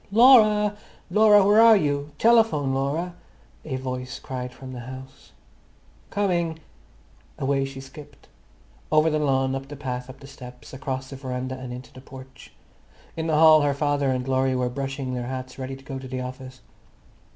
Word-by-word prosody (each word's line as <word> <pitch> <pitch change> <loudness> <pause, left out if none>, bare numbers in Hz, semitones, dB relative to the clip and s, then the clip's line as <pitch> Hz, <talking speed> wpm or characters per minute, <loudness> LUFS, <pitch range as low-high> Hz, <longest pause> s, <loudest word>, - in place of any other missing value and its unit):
"Laura, 215 -3 +6 0.4
Laura, 210 -2 +6
where 210 +2 +6
are 230 -1 +8
you? 145 -3 -1
Telephone, 225 - +3
Laura!" 145 +7 -2 0.5
a 140 -4 -4
voice 130 0 -5
cried 125 -1 -6
from 130 +1 -10
the 125 - -7
house. 130 +2 -11 0.8
"Coming!" 175 -5 -1 0.8
Away 135 0 0
she 135 0 -8
skimmed, 140 +2 -13 0.6
over 155 +1 +4
the 155 - 0
lawn, 135 -2 +1
up 135 0 -5
the 145 - -8
path, 125 -2 -5
up 130 +1 -11
the - - -13
steps, 125 -2 -12
across 130 0 -5
the 135 - -7
veranda, 130 -1 -4
and 130 -1 -8
into 125 +1 -9
the 130 - -12
porch. 130 0 -13 0.6
In 160 0 -3
the 155 -2 +1
hall 155 -1 +7
her 145 -1 +1
father 145 -1 0
and 130 0 -2
Laurie 130 0 +1
were 125 -1 0
brushing 135 0 -4
their 120 -1 -4
hats 130 0 -6
ready 130 0 -5
to 135 0 -16
go 135 -1 -6
to 130 - -9
the 130 0 -4
office. 130 0 -8
135 Hz, 175 wpm, -24 LUFS, 130-155 Hz, 0.8 s, are